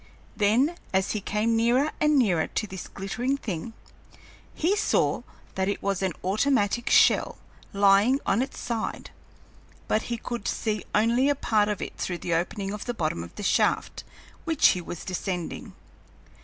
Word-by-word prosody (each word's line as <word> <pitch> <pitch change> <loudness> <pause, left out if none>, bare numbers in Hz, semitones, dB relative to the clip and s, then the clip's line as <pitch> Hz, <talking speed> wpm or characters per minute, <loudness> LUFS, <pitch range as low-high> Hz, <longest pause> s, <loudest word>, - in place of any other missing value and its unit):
Then, 245 +11 +2 0.2
as 190 0 +1
he 210 - -2
came 215 +3 0
nearer 245 +6 +2
and 300 -1 +3
nearer 185 -11 +2
to - - -2
this 190 -3 -8
glittering 240 +8 -2
thing, 215 -2 -5 0.8
he 355 +6 +1
saw 420 - +1 0.3
that 190 0 -1
it 200 - -3
was 195 -2 0
his 190 -1 0
automatic 215 +2 +1
shell, - - +4 0.3
lying 200 +6 +4
on 195 +5 +2
its 265 - -4
side, 230 -2 -4 0.8
but 215 - +1
he 235 - -1
could 235 -1 -5
see 215 -2 -2
only 235 +6 +3
a 285 - +2
part 215 -6 +1
of 210 - -2
it - - -8
through 175 - -3
the 170 - -3
opening 195 +4 -2
of 210 - -6
the 245 - -3
bottom 155 - -2
of 85 - -12
the 205 - -6
shaft - - +1 0.4
which 325 -3 +4
he 180 - 0
was 170 0 -7
descending. 180 -1 -4
210 Hz, 165 wpm, -26 LUFS, 195-245 Hz, 0.8 s, shell